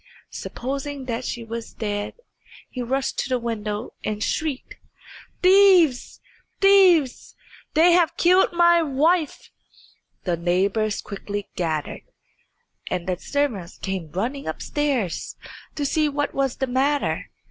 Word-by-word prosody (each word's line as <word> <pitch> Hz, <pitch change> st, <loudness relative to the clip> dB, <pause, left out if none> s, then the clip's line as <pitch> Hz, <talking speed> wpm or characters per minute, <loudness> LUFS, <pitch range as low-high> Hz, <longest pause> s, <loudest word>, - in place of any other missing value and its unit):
Supposing 275 Hz, +2 st, -5 dB
that 240 Hz, 0 st, -3 dB
she 235 Hz, -, -4 dB
was 230 Hz, 0 st, -7 dB
dead, 205 Hz, -1 st, -3 dB, 0.6 s
he 255 Hz, -, -5 dB
rushed 265 Hz, +3 st, -2 dB
to -, -, -2 dB
the 255 Hz, -, +1 dB
window 220 Hz, -2 st, -4 dB
and 215 Hz, 0 st, -2 dB
shrieked, 305 Hz, -5 st, -3 dB, 0.7 s
"Thieves 365 Hz, -8 st, +5 dB, 0.4 s
thieves! 370 Hz, -9 st, +4 dB, 0.4 s
They 330 Hz, +3 st, +6 dB
have 345 Hz, -1 st, +3 dB
killed 365 Hz, +2 st, +4 dB
my 345 Hz, -1 st, +5 dB
wife." 315 Hz, +2 st, 0 dB, 0.7 s
The 175 Hz, -2 st, -1 dB
neighbours 195 Hz, +5 st, 0 dB
quickly 205 Hz, 0 st, -6 dB
gathered, 160 Hz, -4 st, -2 dB, 0.9 s
and 180 Hz, -2 st, -2 dB
the 180 Hz, -1 st, -2 dB
servants 235 Hz, -12 st, -2 dB
came 190 Hz, -5 st, -4 dB
running 245 Hz, +10 st, -3 dB
upstairs 245 Hz, -, -2 dB, 0.4 s
to 290 Hz, -, -2 dB
see 305 Hz, +2 st, +1 dB
what 290 Hz, 0 st, -2 dB
was 270 Hz, -2 st, 0 dB
the 265 Hz, -, 0 dB
matter. 270 Hz, +3 st, 0 dB
260 Hz, 120 wpm, -23 LUFS, 205-300 Hz, 0.9 s, They